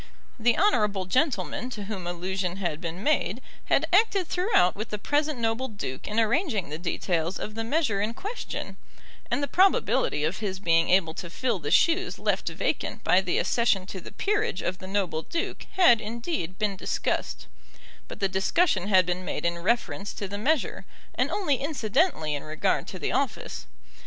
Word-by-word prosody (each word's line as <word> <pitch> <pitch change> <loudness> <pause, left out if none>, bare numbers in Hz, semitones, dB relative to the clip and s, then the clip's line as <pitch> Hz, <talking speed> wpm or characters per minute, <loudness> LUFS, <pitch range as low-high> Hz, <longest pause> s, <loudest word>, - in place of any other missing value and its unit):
The 235 +1 +3
honourable 210 - +2
gentleman 255 - 0
to 215 -5 -6
whom 195 -4 -5
allusion 180 +1 -2
had 175 -5 -2
been 170 +3 -5
made 240 - +1 0.3
had - - +3
acted 395 -2 +4
throughout 355 - +2
with 215 +2 -5
the 210 - -3
present 295 +6 0
noble 230 +2 0
duke 200 - -6
in 215 +2 0
arranging 225 - +1
the 155 +2 -5
details 175 0 -1
of 210 - -5
the 225 +1 -3
measure 230 -5 +1
in 220 +3 -2
question; 420 +5 -5 0.5
and 285 - 0
the - - 0
probability 370 - +3
of 160 +5 0
his 195 -3 -3
being 165 -3 +3
able 180 -3 +3
to 175 +1 -6
fill 235 +2 -1
the 145 -2 -4
shoes 360 +3 +3
left - - 0
vacant - - -2
by - - +4
the - - -1
accession 225 -6 +2
to 190 -1 -7
the - - -10
peerage 425 +3 -1
of 185 +1 -2
the 185 - -8
noble 190 -5 -1
duke 335 - -4
had, 240 -12 +6
indeed, 225 - -4
been 210 -2 0
discussed; - - -2 0.6
but - - -9
the 195 - +2
discussion 195 - +1
had 190 -3 +5
been 180 +1 -2
made 180 - -4
in 170 0 0
reference 205 +1 -1
to 200 - -4
the 200 +1 -5
measure, 300 +5 0 0.3
and - - +1
only 310 -10 +1
incidentally 270 - 0
in 145 - -2
regard 155 0 -1
to - - -6
the - - -2
office. - - -2
210 Hz, 180 wpm, -27 LUFS, 185-280 Hz, 0.6 s, had